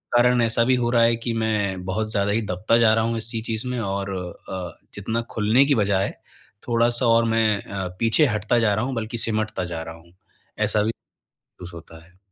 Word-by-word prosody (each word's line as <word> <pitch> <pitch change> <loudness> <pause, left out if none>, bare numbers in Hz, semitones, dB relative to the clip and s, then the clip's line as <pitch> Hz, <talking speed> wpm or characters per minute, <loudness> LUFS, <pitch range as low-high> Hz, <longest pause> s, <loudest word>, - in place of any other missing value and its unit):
कारण 125 +1 +5
में 120 - +3
ऐसा 115 +1 +2
भी 130 - +3
हो 120 -1 0
रहा 120 -1 +4
है 115 0 +4
कि 115 0 -4
मैं 105 -4 -1
बहुत 110 +3 -2
ज़्यादा 100 -1 0
ही 115 - +1
दबता 95 +6 +2
जा 115 -2 +5
रहा 110 0 +2
हूँ 115 0 -1
इसी 115 0 -4
चीज़ 115 +2 -3
में 125 -1 -2
और 100 -2 -3 0.4
अ, 90 -3 -6 0.2
जितना 110 +4 -2
खुलने 110 +6 +3
की 140 - +2
बजाए 100 -3 +1 0.5
थोड़ा-सा 120 +1 +1
और 115 0 +4
मैं 115 -2 +2
अ, 95 -2 -5
पीछे 115 +7 +3
हटता 110 +1 +1
जा 105 -3 +2
रहा 110 +4 0
हूँ 130 0 -3
बल्कि 115 +1 -4
सिमटता 110 -4 -1
जा 80 - -3
रहा 85 0 -8
हूँ। 85 +1 -19 0.5
ऐसा 105 0 +2
भी 110 - 0 0.7
सूस 90 -1 -9
होता 80 -1 -12
है। 90 +2 -24
110 Hz, 215 wpm, -23 LUFS, 100-115 Hz, 0.7 s, कारण